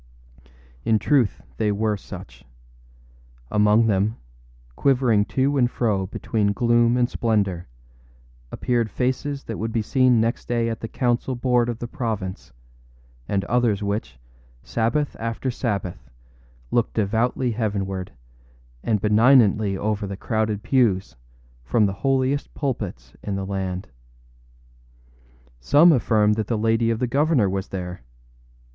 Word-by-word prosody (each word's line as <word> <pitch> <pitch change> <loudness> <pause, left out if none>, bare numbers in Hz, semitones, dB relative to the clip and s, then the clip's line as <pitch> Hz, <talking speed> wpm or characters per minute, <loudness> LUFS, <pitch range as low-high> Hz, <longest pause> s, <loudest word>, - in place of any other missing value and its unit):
In 110 - +3
truth 130 -2 +1
they 105 -2 +1
were 105 +1 0
such. - - -11 1.1
Among 105 +2 +4
them, 105 +1 +1 0.6
quivering 125 -6 +3
to 140 +4 0
and 120 -2 +3
fro 105 -7 0
between 100 +1 -1
gloom 120 0 +3
and 125 -1 +3
splendor, 100 -8 -1 0.8
appeared 120 -3 0
faces 130 +4 -2
that 115 - -6
would 110 +2 -2
be 110 -1 0
seen 130 0 +3
next 115 +1 -1
day 115 -1 0
at 115 - -4
the 115 - -5
council 125 +2 -1
board 120 -1 +1
of 120 - -3
the 120 - -5
province, 110 -8 -4 0.8
and 95 -1 0
others 115 -4 +1
which, 100 - -3 0.5
Sabbath 125 +6 -1
after 115 +3 -2
Sabbath, 100 - -4 0.6
looked 120 -2 0
devoutly 115 +4 0
heavenward, 100 -4 -3 0.7
and 110 -2 +1
benignantly 105 -2 +4
over 105 0 -2
the 100 0 -6
crowded 110 -1 -1
pews, 110 - +1 0.5
from 105 - +2
the 100 - 0
holiest 135 +1 0
pulpits 100 - -4
in 100 - -3
the 95 0 -3
land. 95 -1 -3 1.7
Some 150 - +6
affirm 110 -6 +3
that 110 -1 -2
the 115 - 0
lady 115 +1 +2
of 115 - +1
the 125 - 0
governor 140 -2 +2
was 95 +1 -2
there. 90 -1 -6
110 Hz, 130 wpm, -23 LUFS, 100-120 Hz, 1.7 s, Some